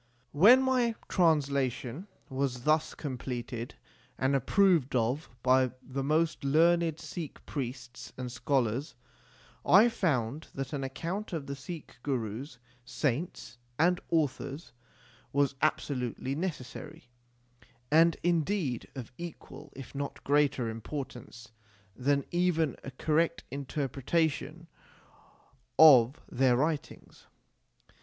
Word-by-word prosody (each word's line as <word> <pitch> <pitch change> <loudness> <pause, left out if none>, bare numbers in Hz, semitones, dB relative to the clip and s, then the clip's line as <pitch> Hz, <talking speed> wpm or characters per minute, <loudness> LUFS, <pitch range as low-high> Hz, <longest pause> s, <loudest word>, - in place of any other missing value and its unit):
When 225 - +7
my 250 -3 +2
translation 140 - +1 0.2
was 130 -3 -2
thus 155 +2 +2
completed 125 -3 -5 0.4
and 135 +1 +1
approved 165 0 +3
of 125 +6 0
by 130 -1 +3
the 135 +1 -4
most 155 +3 +1
learned 165 +2 +3
Sikh 165 -5 -7
priests 125 -2 -6
and 125 -1 -5
scholars, 130 0 -1 0.7
I 210 +6 +7
found 150 - -1
that 135 +2 -4
an 140 -2 -2
account 170 +10 -4
of 155 -4 -3
the 140 - -5
Sikh 145 +1 -9
Gurus, 120 0 -3 0.3
saints, 140 0 -3 0.2
and 175 +3 +3
authors 150 -1 -1 0.6
was 140 -1 +2
absolutely 130 -4 -1
necessary, 155 -2 -6 0.8
and 165 +2 +5
indeed 170 - 0
of 125 -4 -7
equal, 155 -3 -9
if 135 -3 -10
not 140 0 -5
greater 140 -4 +2
importance 115 0 -7 0.4
than 140 +3 +1
even 175 -5 +1
a - - -6
correct 160 +5 0
interpretation 140 +3 -2 1.1
of 135 -4 +7
their 125 -1 +2
writings. 150 +2 -3
140 Hz, 105 wpm, -30 LUFS, 130-165 Hz, 1.1 s, When